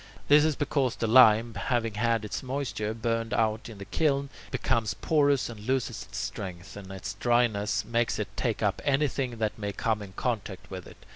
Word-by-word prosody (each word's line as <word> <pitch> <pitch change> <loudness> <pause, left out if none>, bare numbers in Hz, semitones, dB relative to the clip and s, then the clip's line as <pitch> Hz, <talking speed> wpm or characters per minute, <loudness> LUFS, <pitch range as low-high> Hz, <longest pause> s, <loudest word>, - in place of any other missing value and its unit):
This 145 +1 +7
is 155 -2 +1
because 140 -4 0
the - - -2
lime, 115 -1 +6
having 115 +2 -1
had 115 0 +1
its 105 - -4
moisture 130 -5 -3
burned 115 0 -1
out 110 +1 0
in 110 - -10
the 100 - -8
kiln, 140 - 0 0.2
becomes 110 -8 0
porous 145 -4 +2
and 115 -3 -8
loses 120 -1 -1
its - - -7
strength, 95 -2 -5
and 95 -2 -9
its 95 -1 -5
dryness 110 -5 +1
makes 115 0 0
it - - -4
take - - -1
up - - 0
anything 135 -3 0
that 110 -1 -2
may 105 -1 -2
come 110 +1 -1
in 95 -2 -9
contact 100 -5 -3
with 95 -2 -7
it. - - -16
115 Hz, 190 wpm, -28 LUFS, 105-130 Hz, 0.2 s, This